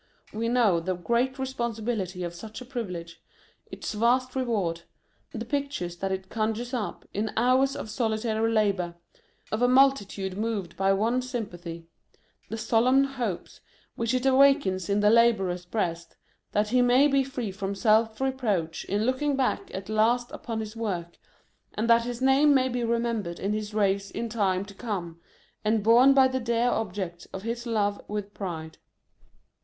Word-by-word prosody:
We 230 Hz, +2 st, -1 dB
know 230 Hz, -8 st, +3 dB
the 185 Hz, +2 st, -2 dB
great 235 Hz, +8 st, 0 dB
responsibility 230 Hz, -7 st, -3 dB
of 175 Hz, -1 st, -4 dB
such 215 Hz, +5 st, -9 dB
a 250 Hz, -, -9 dB
privilege; 180 Hz, -10 st, -6 dB, 0.5 s
its -, -, -5 dB
vast 250 Hz, +4 st, +1 dB
reward; 205 Hz, -10 st, -1 dB, 0.5 s
the 225 Hz, +1 st, -5 dB
pictures 275 Hz, -10 st, -3 dB
that 195 Hz, +2 st, -2 dB
it 190 Hz, 0 st, -3 dB
conjures 225 Hz, +4 st, -2 dB
up, 230 Hz, -5 st, -4 dB
in 215 Hz, +2 st, -1 dB
hours 255 Hz, +3 st, +3 dB
of -, -, -5 dB
solitary 220 Hz, 0 st, 0 dB
labour, 195 Hz, -6 st, +1 dB, 0.6 s
of 215 Hz, -, -1 dB
a 245 Hz, -, +5 dB
mul 270 Hz, +2 st, +7 dB
titude 195 Hz, -6 st, -6 dB
moved 210 Hz, -5 st, -3 dB
by 195 Hz, 0 st, +2 dB
one 225 Hz, +6 st, +1 dB
sympathy; 175 Hz, -10 st, -6 dB, 0.6 s
the 225 Hz, -, -4 dB
solemn 245 Hz, +5 st, +3 dB
hopes 250 Hz, -9 st, -4 dB, 0.3 s
which 230 Hz, +2 st, 0 dB
it 255 Hz, +1 st, -1 dB
awakens 265 Hz, -, +4 dB
in 200 Hz, +1 st, +2 dB
the 210 Hz, 0 st, +5 dB
labourer's 195 Hz, -7 st, +3 dB
breast, 170 Hz, -4 st, -3 dB, 0.4 s
that 210 Hz, +1 st, +1 dB
he 250 Hz, +2 st, +3 dB
may 250 Hz, +4 st, +5 dB
be 275 Hz, -1 st, +3 dB
free 255 Hz, -6 st, -4 dB
from 195 Hz, 0 st, -4 dB
self 220 Hz, +1 st, +2 dB
reproach 225 Hz, -12 st, -1 dB
in 205 Hz, +2 st, 0 dB
looking 275 Hz, +3 st, +1 dB
back 265 Hz, -2 st, -1 dB
at 190 Hz, +1 st, -6 dB
last 230 Hz, +3 st, +2 dB
upon 225 Hz, -2 st, -4 dB
his 215 Hz, 0 st, -7 dB
work, 180 Hz, -7 st, -4 dB, 0.6 s
and 220 Hz, +2 st, -1 dB
that 230 Hz, 0 st, +5 dB
his 245 Hz, +1 st, -4 dB
name 280 Hz, +2 st, +5 dB
may 260 Hz, -1 st, +3 dB
be 245 Hz, -1 st, -2 dB
remembered 230 Hz, -6 st, -1 dB
in 200 Hz, +2 st, -1 dB
his 215 Hz, 0 st, -3 dB
race 200 Hz, -1 st, +1 dB
in 235 Hz, -, -4 dB
time 195 Hz, -4 st, 0 dB
to 200 Hz, -, -12 dB
come, 190 Hz, -6 st, -5 dB, 0.4 s
and 215 Hz, 0 st, +1 dB
borne 240 Hz, +5 st, +7 dB
by 265 Hz, -1 st, +7 dB
the 260 Hz, 0 st, -2 dB
dear 235 Hz, 0 st, +1 dB
objects 185 Hz, -6 st, -3 dB
of 190 Hz, -, -8 dB
his 235 Hz, +2 st, -4 dB
love 205 Hz, -3 st, 0 dB
with 205 Hz, -1 st, -5 dB
pride. 160 Hz, -5 st, -6 dB
220 Hz, 165 wpm, -27 LUFS, 195-245 Hz, 0.6 s, mul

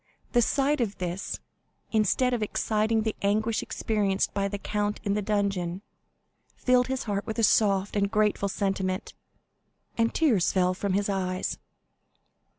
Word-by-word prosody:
The 240 Hz, -, +4 dB
sight 275 Hz, +3 st, +2 dB
of 210 Hz, -4 st, -2 dB
this, 180 Hz, +2 st, -4 dB, 0.5 s
instead 225 Hz, +4 st, +2 dB
of 240 Hz, -, -1 dB
exciting 215 Hz, +1 st, +1 dB
the 220 Hz, -1 st, -1 dB
anguish 215 Hz, +3 st, +1 dB
experienced 205 Hz, -3 st, -1 dB
by 200 Hz, 0 st, 0 dB
the 205 Hz, +1 st, -4 dB
count 210 Hz, +1 st, -2 dB
in 200 Hz, -2 st, 0 dB
the 210 Hz, -, 0 dB
dungeon, 195 Hz, -3 st, -1 dB, 0.7 s
filled 250 Hz, -1 st, +3 dB
his 265 Hz, 0 st, -2 dB
heart 205 Hz, -2 st, -3 dB
with 220 Hz, -, -4 dB
a 230 Hz, -, +1 dB
soft 200 Hz, -2 st, +3 dB
and 200 Hz, -1 st, +2 dB
grateful 210 Hz, -2 st, +1 dB
sentiment, 190 Hz, -1 st, -2 dB, 0.9 s
and 230 Hz, 0 st, +3 dB
tears 235 Hz, -, +2 dB
fell 185 Hz, -1 st, +2 dB
from 190 Hz, +1 st, -2 dB
his 200 Hz, +1 st, +1 dB
eyes. 185 Hz, -2 st, -2 dB
205 Hz, 150 wpm, -27 LUFS, 195-220 Hz, 0.9 s, The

